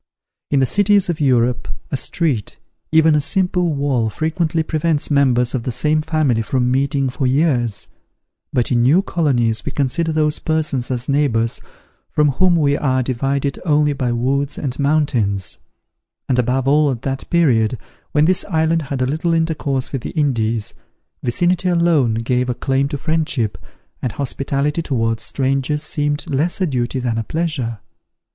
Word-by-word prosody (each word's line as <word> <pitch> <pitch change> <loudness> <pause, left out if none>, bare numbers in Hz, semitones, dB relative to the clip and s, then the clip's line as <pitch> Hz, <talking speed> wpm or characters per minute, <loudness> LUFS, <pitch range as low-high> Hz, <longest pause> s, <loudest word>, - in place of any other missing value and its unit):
In 140 -2 +2
the - - +4
cities 205 +4 +3
of 160 - -5
Europe, 125 -3 +2 0.2
a - - 0
street, 135 - -2 0.3
even 160 0 +5
a 150 - +3
simple 180 +2 +1
wall, 140 -6 0
frequently 160 - -1
prevents 155 -1 -1
members 125 -4 +3
of 130 - -1
the 125 - -3
same 150 +5 +1
family 155 -7 +1
from 125 +3 0
meeting 140 +1 +1
for 130 +1 -1
years; 125 - +1 0.6
but 125 0 0
in 120 -1 +3
new 150 +11 +4
colonies 120 - 0
we - - -4
consider 150 +4 0
those 155 -1 +1
persons 155 -6 -1
as 125 0 -2
neighbours 135 -6 +1 0.5
from 150 -1 +2
whom 175 +6 +3
we 145 -3 +2
are 130 -3 +1
divided 135 +2 -1
only 150 -3 +2
by 130 -3 -1
woods 135 +4 -1
and 130 -2 -4
mountains; 125 -10 0 0.7
and 125 -1 +1
above 125 +2 0
all 150 +1 +4
at 125 -4 -4
that 135 0 -4
period, 125 -9 +2 0.3
when 150 0 +3
this 185 +2 +2
island 160 -2 +1
had 135 -3 -2
little 165 +4 0
intercourse 150 -5 -1
with 135 - -3
the - - -7
Indies, 115 -6 0 0.5
vicinity 175 +8 +1
alone 170 -9 +2
gave 125 +2 0
a 125 - -1
claim 135 +2 0
to 145 0 -4
friendship, 150 -8 -1 0.5
and 125 - -2
hospitality 140 +3 -2
towards 115 -7 -1
strangers 135 +2 -1
seemed 145 -1 -2
less 155 +7 -1
a 190 - +2
duty 125 -4 -2
than 120 -3 -1
a - - -2
pleasure. 145 -5 -2
140 Hz, 160 wpm, -19 LUFS, 125-155 Hz, 0.7 s, even